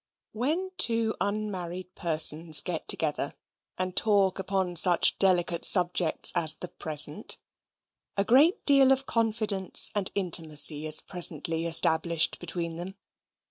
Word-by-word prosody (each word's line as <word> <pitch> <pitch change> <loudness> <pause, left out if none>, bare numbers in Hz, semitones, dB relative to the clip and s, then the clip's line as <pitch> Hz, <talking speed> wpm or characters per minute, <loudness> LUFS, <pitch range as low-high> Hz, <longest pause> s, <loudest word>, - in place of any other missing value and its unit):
When 315 +12 -4
two 230 -1 +2
unmarried 185 -3 -6
persons 160 -2 +3
get 175 -3 -7
together, 150 -2 -1 0.4
and 185 0 -5
talk 200 -3 0
upon 190 -2 -4
such 175 +1 +3
delicate 175 -3 0
subjects 175 -3 +3
as 160 -3 -2
the 180 - -10
present, 150 +4 -2 0.8
a 200 - 0
great 280 - +1
deal 275 -2 +4
of 270 0 -1
confidence 215 -5 +1
and 205 -2 0
intimacy 155 -5 +2
is 155 - +4
presently 165 -2 -2
established 165 0 0
between 170 -1 -6
them. 185 +3 -8
180 Hz, 120 wpm, -25 LUFS, 165-210 Hz, 0.8 s, deal